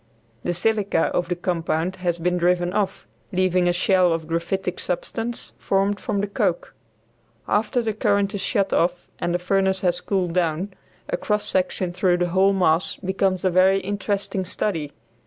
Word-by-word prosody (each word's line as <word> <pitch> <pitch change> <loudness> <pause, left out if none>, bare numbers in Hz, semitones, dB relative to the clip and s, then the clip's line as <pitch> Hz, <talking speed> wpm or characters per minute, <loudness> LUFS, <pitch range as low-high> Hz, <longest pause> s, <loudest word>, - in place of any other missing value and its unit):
The 175 - -1
silica 205 -2 +1
of 175 0 0
the 180 - 0
compound 175 0 -1
has 175 -2 -1
been 180 +1 0
driven 175 0 +2
off, 200 -2 -1 0.3
leaving 185 -1 +2
a - - +4
shell 180 0 +3
of 165 -1 -3
graphitic 170 +3 -2
substance 225 +6 -3
formed 195 +1 +1
from 200 -2 -1
the 205 - -1
coke. 200 -4 -1 0.7
After 230 +4 +1
the 220 -1 -1
current 200 -1 +1
is 200 - -3
shut 195 -1 0
off 175 +1 +1
and 175 - -1
the - - +3
furnace 190 +1 +1
has 180 -1 +1
cooled 180 -2 -1
down, 180 +2 0 0.3
a - - -1
cross 210 0 -1
section 185 -1 0
through 180 -1 +2
the 175 0 0
whole 190 +3 +4
mass 180 -3 +2
becomes 190 0 -1
a 185 - +3
very 190 +2 +4
interesting 200 0 -2
study. 165 -5 -2
185 Hz, 170 wpm, -23 LUFS, 175-195 Hz, 0.7 s, a